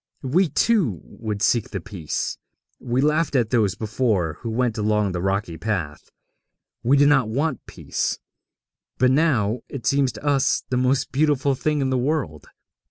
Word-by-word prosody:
We, 160 +7 +2
too, 155 - +1
would 105 -2 -5
seek 115 -2 +2
the - - -4
Peace. 95 -9 -4 0.4
We 125 0 -1
laughed 150 +1 +1
at 120 -4 +1
those 110 -6 +2
before 105 - -1
who 115 - -5
went 115 0 0
along 105 -1 +1
the 90 -1 -3
rocky 95 -3 -1
path; 90 -8 -3 0.7
we 135 +4 +3
did 145 +1 +5
not 135 -6 +3
want 140 +3 -1
peace; - - -3 0.8
but 130 0 +3
now 125 -7 +2
it 135 -5 -7
seems 140 -2 +2
to 105 +3 -10
us 140 -2 +2
the 130 - 0
most 130 +2 +1
beautiful 140 -1 +2
thing 150 +2 -1
in 135 -1 0
the 130 - +1
world. 125 - -2
125 Hz, 165 wpm, -23 LUFS, 105-140 Hz, 0.8 s, did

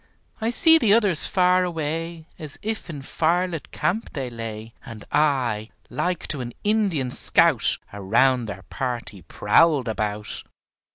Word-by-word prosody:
I 225 - 0
see 320 +6 +6
the 215 -8 +4
others 200 -8 +2
far 185 -1 +3
away 165 -1 -4
As 150 -3 -7
if 220 -3 -4
in 145 -4 -7
firelit 170 0 -1
camp 185 +9 -2
they 130 -5 -4
lay, 115 -1 -7
And 115 -2 -10
I, 125 -8 +1 0.2
like 180 -1 -2
to 145 - -2
an 120 -1 -6
Indian 200 - 0
scout, - - +3 0.2
Around 120 +5 +1
their 95 -2 -7
party 120 -7 -5
prowled 130 - +2
about. 105 -1 -4
145 Hz, 135 wpm, -23 LUFS, 115-180 Hz, 0.2 s, see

